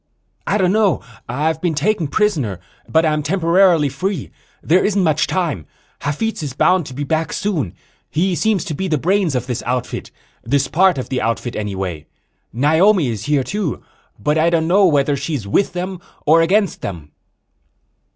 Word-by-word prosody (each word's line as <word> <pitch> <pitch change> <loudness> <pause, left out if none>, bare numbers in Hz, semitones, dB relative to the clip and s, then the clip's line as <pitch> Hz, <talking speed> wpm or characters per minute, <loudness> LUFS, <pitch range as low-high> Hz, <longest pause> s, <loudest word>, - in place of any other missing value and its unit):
"I - - +2
don't 185 -3 +2
know. 205 - +2 0.3
I've 155 +5 -1
been 175 -3 0
taken 175 +2 0
prisoner, 140 - 0 0.3
but 160 +1 +3
I'm 155 -1 +1
temporarily 170 0 +3
free. 175 +4 -3 0.3
There 180 +4 +3
isn't 200 -2 +1
much 155 -2 +2
time. 165 - -2 0.3
Hafitz 190 +10 -2
is 145 -4 -4
bound 180 +3 +2
to 130 - -9
be 145 - -3
back 160 +2 -1
soon. 185 - -2 0.3
He 180 +4 0
seems 205 0 +1
to 170 - -4
be 190 +6 -3
the 155 -4 +1
brains 180 0 +1
of 125 -1 -1
this 125 -2 -3
outfit 125 0 -3 0.3
this 135 +3 +1
part 185 +2 +3
of 130 - -4
the 130 - -1
outfit, 115 +2 -2
anyway. 95 -7 -4 0.4
Naomi 160 - +3
is 110 -3 -4
here, 145 -3 +2
too, 195 - -3 0.3
but 150 +9 0
I 165 +2 +4
don't 165 -1 +1
know 190 +3 +5
whether 145 -2 +2
she's 140 -7 -4
with 190 - +1
them 180 0 -4 0.2
or 160 +2 +5
against 195 +4 +1
them." 80 -6 -6
160 Hz, 170 wpm, -19 LUFS, 130-185 Hz, 0.4 s, know